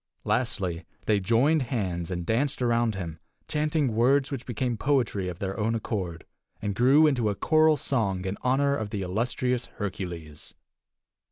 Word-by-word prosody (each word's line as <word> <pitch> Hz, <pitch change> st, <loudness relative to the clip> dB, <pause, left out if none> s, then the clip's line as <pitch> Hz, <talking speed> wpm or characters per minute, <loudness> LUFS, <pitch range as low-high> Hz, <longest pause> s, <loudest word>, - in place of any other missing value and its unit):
Lastly, 95 Hz, -9 st, -1 dB, 0.2 s
they 105 Hz, -2 st, +3 dB
joined 120 Hz, +10 st, +3 dB
hands 95 Hz, -10 st, -2 dB
and 90 Hz, -2 st, -3 dB
danced 135 Hz, +8 st, 0 dB
around 120 Hz, -2 st, +2 dB
him, 85 Hz, -4 st, -5 dB, 0.3 s
chanting 150 Hz, -4 st, 0 dB
words 135 Hz, +5 st, +3 dB
which 135 Hz, -3 st, -5 dB
became 120 Hz, 0 st, -1 dB
poetry 120 Hz, -7 st, 0 dB
of 90 Hz, -2 st, -5 dB
their 95 Hz, +2 st, -4 dB
own 110 Hz, +2 st, +1 dB
accord, 95 Hz, -7 st, -4 dB, 0.3 s
and 105 Hz, -1 st, -2 dB
grew 135 Hz, +8 st, +5 dB
into 125 Hz, -8 st, +2 dB
a 100 Hz, -, -1 dB
choral 155 Hz, +3 st, +4 dB
song 100 Hz, -11 st, -1 dB
in 95 Hz, +1 st, -2 dB
honor 140 Hz, +2 st, +2 dB
of 110 Hz, -5 st, -3 dB
the 105 Hz, -3 st, -3 dB
illustrious 120 Hz, +5 st, -1 dB
Hercules. 90 Hz, -8 st, -6 dB
115 Hz, 155 wpm, -27 LUFS, 95-130 Hz, 0.3 s, grew